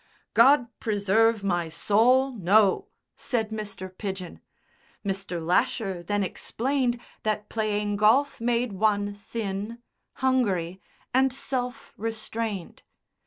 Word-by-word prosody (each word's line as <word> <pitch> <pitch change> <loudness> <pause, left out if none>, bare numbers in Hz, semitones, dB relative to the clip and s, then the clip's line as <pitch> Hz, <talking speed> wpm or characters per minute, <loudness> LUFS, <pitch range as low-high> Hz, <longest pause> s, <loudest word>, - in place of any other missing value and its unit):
"God 275 -2 +6
preserve 215 +1 +2
my 175 -4 0
soul! 230 +10 +3
No!" 210 - +3 0.3
said 225 -4 -1
Mr. 205 -4 -6
Pidgen. 190 -3 -6 0.6
Mr. 195 -3 -2
Lasher 190 0 +1
then 205 +4 0
explained 245 +5 -1 0.2
that 210 -1 -2
playing 210 -2 -1
golf 235 +6 +3
made 235 -1 +1
one 205 0 +1
thin, 205 +1 -5 0.4
hungry 195 -9 0 0.3
and 265 +1 +4
self 250 -2 -4
restrained. 220 -3 -4
215 Hz, 100 wpm, -26 LUFS, 195-240 Hz, 0.6 s, God